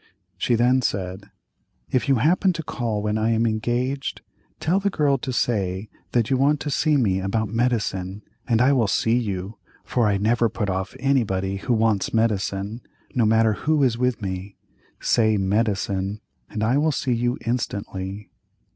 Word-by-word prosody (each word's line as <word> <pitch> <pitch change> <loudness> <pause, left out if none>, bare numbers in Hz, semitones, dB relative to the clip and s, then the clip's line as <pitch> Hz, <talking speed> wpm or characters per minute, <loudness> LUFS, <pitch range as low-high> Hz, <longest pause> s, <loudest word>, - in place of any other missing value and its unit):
She 120 +6 +1
then 125 +3 +3
said: 95 -3 -3 0.6
"If 130 +3 +1
you 135 - +5
happen 175 - +3
to 165 -1 -5
call 115 -7 -2
when 105 +1 0
I 110 +1 +1
am 115 0 +2
engaged, 120 +5 -1 0.4
tell 175 +5 +2
the 200 0 +1
girl 145 -7 +1
to 130 - -4
say 100 -5 -1 0.2
that 120 0 +1
you 130 - +3
want 145 +3 +3
to 145 - -3
see 150 +1 +2
me 100 -8 +2
about 100 +3 -1
medicine, 105 -5 -1 0.2
and 115 0 +3
I 135 +2 +4
will 120 -5 +2
see 115 +3 +2
you, 100 -3 -3 0.3
for 120 -3 +1
I 100 -1 +2
never 115 +3 +2
put 105 -3 -2
off 95 0 -3
anybody 100 -8 +1
who 120 - -1
wants 110 -1 +1
medicine, 105 0 0 0.3
no 120 -4 +2
matter 110 0 +4
who 150 +6 +1
is 125 -4 +3
with 125 -2 -1
me, 95 +1 -5 0.4
say 110 -2 +2
medicine, 100 0 0 0.3
and 105 0 -3
I 125 +6 +3
will 155 +1 +2
see 135 -2 -1
you 120 +2 0
instantly." 100 -4 -3
115 Hz, 170 wpm, -23 LUFS, 100-125 Hz, 0.6 s, you